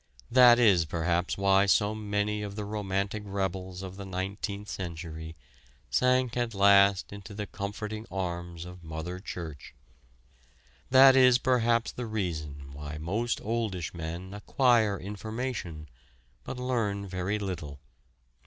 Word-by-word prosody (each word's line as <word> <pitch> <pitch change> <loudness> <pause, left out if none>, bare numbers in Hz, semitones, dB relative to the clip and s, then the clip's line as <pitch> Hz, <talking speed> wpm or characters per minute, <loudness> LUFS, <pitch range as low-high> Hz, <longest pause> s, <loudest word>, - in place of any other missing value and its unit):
That 125 -1 +8
is 100 -9 +5
perhaps 85 +2 -1
why 100 0 +4
so 105 +2 +3
many 105 0 -1
of 100 -1 -5
the 105 -1 -4
romantic 100 0 -2
rebels 95 -2 -3
of 95 0 -8
the 100 - -6
Nineteenth 100 +2 -4
Century 80 -3 -6 0.6
sank 125 -1 +2
at 120 -3 -1
last 100 0 +5
into 100 0 -9
the 105 0 -3
comforting 105 +2 -5
arms 85 -2 -4
of 90 0 -11
Mother 80 +3 -5
Church. 80 - -8 1.1
That 135 0 +8
is 125 -2 +7
perhaps 120 -2 +2
the 120 -1 -5
reason 75 -10 -4
why 75 +1 -7
most 105 +10 -2
oldish 105 -6 -2
men 85 +3 -6
acquire 110 -1 +2
information, 105 -5 -5 0.6
but - - -6
learn 115 -6 -1
very 95 +2 -2
little. 80 -8 -5
100 Hz, 125 wpm, -29 LUFS, 90-110 Hz, 1.1 s, That